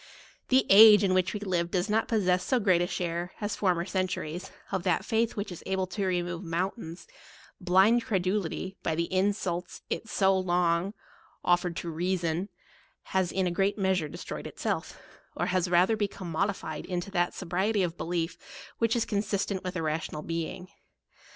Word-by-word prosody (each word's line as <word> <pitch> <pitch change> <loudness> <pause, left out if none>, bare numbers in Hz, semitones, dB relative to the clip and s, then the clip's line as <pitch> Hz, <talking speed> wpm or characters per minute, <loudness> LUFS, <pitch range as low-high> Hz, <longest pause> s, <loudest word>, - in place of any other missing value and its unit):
The 260 0 +4
age 210 0 +9
in 190 -2 +3
which 185 -1 +2
we - - -2
live 175 -4 -1
does 180 +1 0
not 220 +1 +1
possess 185 -5 +2
so 255 - +1
great 185 -5 +3
a 175 - +1
share, 175 0 -3
as 205 -1 -2
former 180 -4 +1
centuries, 185 -2 -3 0.2
of 190 -2 0
that 180 -1 0
faith 225 0 +1
which 205 -1 -4
is 175 - -8
able 190 -1 0
to 190 +1 -3
remove 175 0 -2
moun 175 +3 -1
tains: 170 -6 -10 0.5
blind 190 +6 +4
credulity, 190 -2 -1
by 160 - -1
the 170 +2 -2
insults 185 -2 -1
it 225 - -3
so 195 -2 +3
long 180 +1 +1 0.5
offered 175 -1 +2
to 170 - -4
reason, 175 +2 -1 0.6
has 190 -2 +2
in 190 -1 0
a 180 - 0
great 195 +4 +1
meas 190 -2 +2
ure 155 -3 -4
destroyed - - -6
itself, - - -3 0.4
or - - -1
is 185 -1 +1
rather 180 +5 +4
become 200 -4 -3
mod 190 +6 +1
ified 160 -6 -5
into 180 +1 -4
that 175 -2 0
sobriety 190 +3 0
of 170 -1 -2
belief 170 -1 -3 0.4
which 230 0 +2
is 235 - +1
con* 205 - -2
170 205 +1 -2
sistent 195 -1 -1
with 185 0 -4
a 165 - -2
rational 155 -1 -3
being. 165 +2 -4
185 Hz, 185 wpm, -28 LUFS, 175-200 Hz, 0.6 s, age